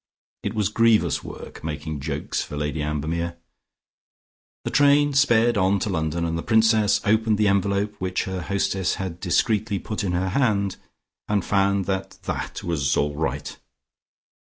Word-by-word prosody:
It 105 +2 -4
was 105 -2 +1
grievous 115 0 +3
work - - -10
making 80 -1 -4
jokes 75 +1 -3
for 75 - -6
Lady 75 +1 -2
Ambermere. 80 +3 -2 1.3
The - - -3
train 145 0 +4
sped 120 -5 +4
on 95 +1 +3
to 100 - -2
London, 80 0 -1
and 85 0 -1
the 85 - -2
Princess 110 0 +3
opened 110 0 +2
the 105 0 +3
envelope 100 +1 +1
which 90 0 -1
her 95 -1 -4
hostess 95 +1 0
had 90 -3 -5
discreetly 105 +3 +1
put 105 +2 -4
in 90 -3 -1
her 95 +2 0
hand, 100 -4 +1 0.5
and 105 -3 0
found 100 -1 +2
that 95 0 -3
that - - -4
was 70 -6 0
all 75 0 0
right. 75 -2 -3
95 Hz, 150 wpm, -24 LUFS, 85-105 Hz, 1.3 s, train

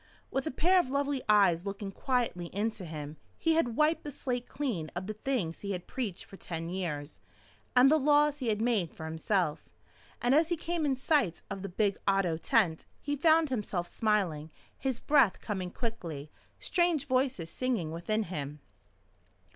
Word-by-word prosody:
With 270 +3 -1
a - - +1
pair 360 +7 +4
of 305 - 0
lovely 280 0 0
eyes 190 -5 +5
looking 200 0 -5
quietly 235 -7 -1
into 210 -2 -1
him, 155 -1 -7 0.2
he 325 - +2
had 280 -8 +1
wiped 305 +3 +2
the 295 - -5
slate 250 -3 -3
clean 220 - -2
of 180 +1 -3
the 215 - -4
things 215 -7 -2
he 200 -1 -3
had 180 -1 -5
preached 220 -9 -4
for 195 - -13
ten 165 -2 -5
years 160 -5 -4 0.6
and 255 +3 +7
the 315 - +5
laws 295 +1 +4
he 255 - -3
had 215 0 +1
made 215 -9 +1
for 160 - -7
himself. 160 0 -1 0.5
And 245 +2 +2
as 315 +3 +4
he 345 - 0
came 335 -1 -1
in 270 - +2
sight 260 - +1
of 195 -1 -4
the 195 - -5
big 200 +2 0
Otto 195 -4 +2
tent, 180 -4 +1
he 290 0 -2
found 315 +1 +4
himself 205 -8 -2
smiling, 180 -8 0 0.3
his 260 -3 -2
breath 275 -9 +4
coming 190 -4 -3
quickly, 170 - -5 0.3
strange 345 -5 +1
voices 255 -10 0
singing 235 -11 -1
within 215 +7 -1
him. 150 -5 -5
215 Hz, 175 wpm, -30 LUFS, 175-275 Hz, 0.6 s, and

